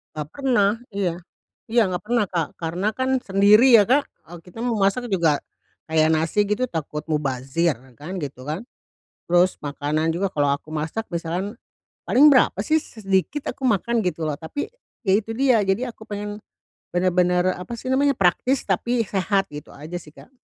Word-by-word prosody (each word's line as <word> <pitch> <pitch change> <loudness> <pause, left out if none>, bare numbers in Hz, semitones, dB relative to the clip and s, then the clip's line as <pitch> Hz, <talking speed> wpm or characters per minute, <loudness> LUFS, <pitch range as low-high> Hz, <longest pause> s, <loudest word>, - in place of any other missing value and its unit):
Enggak 150 -1 -4
pernah 245 -8 +2 0.2
iya. 185 -4 -1 0.5
Iya 235 +1 +3
enggak 180 +2 -3
pernah, 235 -2 +2
Kak, 165 -4 0
karena 175 +5 -3
kan 260 +1 +1
sendiri 210 +4 +6
ya, 215 - +8
Kak, 265 +7 +2 0.3
eee, 175 - -8
kita 180 +7 -9
mau 235 -3 0
masak 210 +4 +1
juga 165 -6 +2 0.5
kayak 155 -1 +4
nasi 165 +6 +1
gitu 210 +5 0
takut 150 - -4
mubazir 140 +2 0 0.2
kan 175 +6 -6
gitu 135 -1 -7
kan. 160 +8 -3 0.7
Terus, 175 +1 +3
makanan 150 +2 -1
juga 195 +4 0
kalau 145 -1 +2
aku 155 +2 -7
masak 160 +9 -3
misalkan, 175 +5 -3 0.5
paling 290 +4 +6
berapa 255 - +4
sih 315 0 +2
s-sedikit 210 - -2
aku - - -33
makan 230 +1 +1
gitu 175 -3 -2
loh. 150 - -1
Tapi, 230 - -5 0.4
ya 190 - +3
itu 225 +1 -1
dia. 255 -5 +4
Jadi 195 +6 0
aku 230 -2 -10
pengen, 205 0 -5 0.5
benar-benar 180 0 +2
apa 210 +6 -7
sih 255 +3 -6
namanya, 280 +2 +3
praktis 245 +8 +2
tapi 235 +5 0
sehat, 195 -1 0
gitu 150 0 -9
aja 155 +5 -6
sih, 150 -3 -15
Kak. 265 - -17
190 Hz, 170 wpm, -23 LUFS, 165-230 Hz, 0.7 s, ya